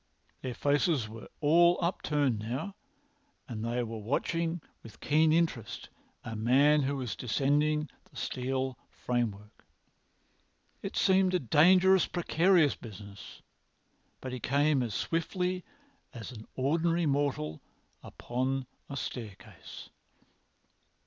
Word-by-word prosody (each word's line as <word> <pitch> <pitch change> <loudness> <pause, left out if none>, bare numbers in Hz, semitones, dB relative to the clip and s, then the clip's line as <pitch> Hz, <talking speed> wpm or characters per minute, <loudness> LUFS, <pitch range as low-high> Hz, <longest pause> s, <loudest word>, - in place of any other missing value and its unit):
Their 125 -2 -4
faces 145 -3 +1
were 110 +1 -10
all 170 +4 +5
upturned 150 - 0
now, 130 - -4 0.7
and 110 -3 -5
they 120 +1 -1
were 115 -1 -5
watching 165 +9 -1 0.2
with 115 - -13
keen 155 +1 +3
interest 125 -9 -1 0.3
a 115 - -6
man 135 +7 +4
who 140 +1 -1
was 125 -6 -4
descending 145 +5 +1 0.2
the - - -24
steel 130 0 -3
framework. 110 -4 -3 1.2
It - - -5
seemed 190 -1 +3
a - - +3
dangerous, 180 - +5
precarious 175 -2 +3
business, 100 -2 -11 0.8
but 130 -1 -5
he 130 - -4
came 140 +2 +2
as 115 -5 -3
swiftly 180 +2 -1 0.5
as 115 0 -7
an 110 -3 -11
ordinary 165 +5 +1
mortal 140 - -1 0.4
upon 130 +2 -3 0.2
a 140 - -5
staircase. 105 -7 -8
135 Hz, 110 wpm, -30 LUFS, 120-165 Hz, 1.2 s, all